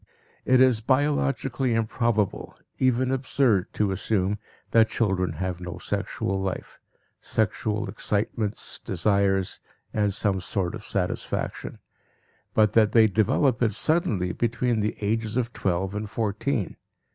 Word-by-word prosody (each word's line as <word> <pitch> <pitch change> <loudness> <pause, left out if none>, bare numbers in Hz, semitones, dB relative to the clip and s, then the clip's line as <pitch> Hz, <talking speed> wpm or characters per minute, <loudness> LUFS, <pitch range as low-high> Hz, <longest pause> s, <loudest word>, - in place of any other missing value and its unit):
It 130 0 +4
is 130 -4 +4
biologically 135 -1 +1
improbable, 115 -2 -1 0.2
even 130 0 +2
absurd, 130 -6 +1
to 105 -2 +1
assume 100 +1 0 0.3
that 115 -1 +5
children 95 -6 0
have 90 +2 -3
no 90 -1 -6
sexual 95 0 -2
life 95 -1 -5 0.4
sexual 110 -1 -1
excitements, 105 +1 -1
desires, 95 0 0 0.3
and 105 -1 +1
some 100 -1 0
sort 90 -1 -1
of - - -7
satisfaction - - -3 0.8
but 105 -2 +4
that 110 -2 +4
they 115 -1 +7
develop 110 +5 +2
it 110 -3 +2
suddenly 110 - +1
between 120 +3 0
the 105 0 -1
ages 110 +2 -1
of 120 -1 -1
twelve 95 +1 -1
and 105 0 -4
fourteen. 110 +1 -2
110 Hz, 125 wpm, -25 LUFS, 95-120 Hz, 0.8 s, they